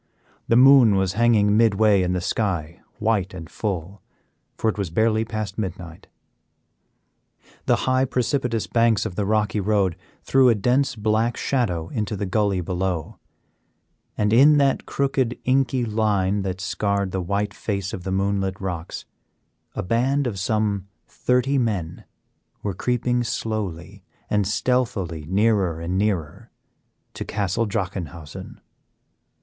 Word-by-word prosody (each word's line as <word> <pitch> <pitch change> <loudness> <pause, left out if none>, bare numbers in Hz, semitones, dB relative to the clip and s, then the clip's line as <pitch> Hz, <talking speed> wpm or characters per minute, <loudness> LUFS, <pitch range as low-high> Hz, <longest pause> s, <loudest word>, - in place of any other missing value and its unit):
The 115 - +3
moon 125 -4 +7
was 95 -1 +1
hanging 105 -2 +3
midway 110 -2 +4
in 90 0 0
the 90 - -1
sky, 85 -5 -2 0.2
white 105 -4 0
and 80 -3 -8
full, 95 +1 -4 0.6
for - - -1
it 110 - +1
was 100 -4 -2
barely 110 +5 +2
past 110 -2 -5
midnight. 90 -5 -6 1.6
The - - +5
high 130 0 +2
precipitous 125 -2 -1
banks 115 -3 +2
of - - -4
the 100 +1 -2
rocky 105 0 +1
road 100 -3 +1 0.3
threw 135 -1 +4
a 115 - +4
dense 125 +6 +1
black 110 +2 0
shadow 90 -12 -1
into 105 +1 -3
the 100 - -3
gully 100 -1 0
below, 90 -2 -3 1.0
and 105 +1 +1
in 145 +5 +7
that 140 -2 +1
crooked 135 -3 0
inky 130 -1 +1
line 105 -3 +1
that 95 -1 -4
scarred 100 0 -1
the 95 - -2
white 100 +3 -2
face 100 -3 -3
of 90 - -6
the 95 - -3
moonlit 95 0 -1
rocks 90 -3 -5 0.7
a - - -2
band 130 +8 +1
of 105 -6 -3
some 100 -1 -1 0.2
thirty 125 +2 +1
men 95 -8 -2 0.6
were 100 - -2
creeping 125 +3 0
slowly 110 -8 -4 0.3
and 105 -2 +2
stealthily 100 -7 -1
nearer 95 -3 +1
and 85 +2 -3
nearer 95 -8 -2 0.6
to - - -5
Castle 105 +2 -1
Drachenhausen. 90 -7 -5
105 Hz, 135 wpm, -23 LUFS, 95-115 Hz, 1.6 s, moon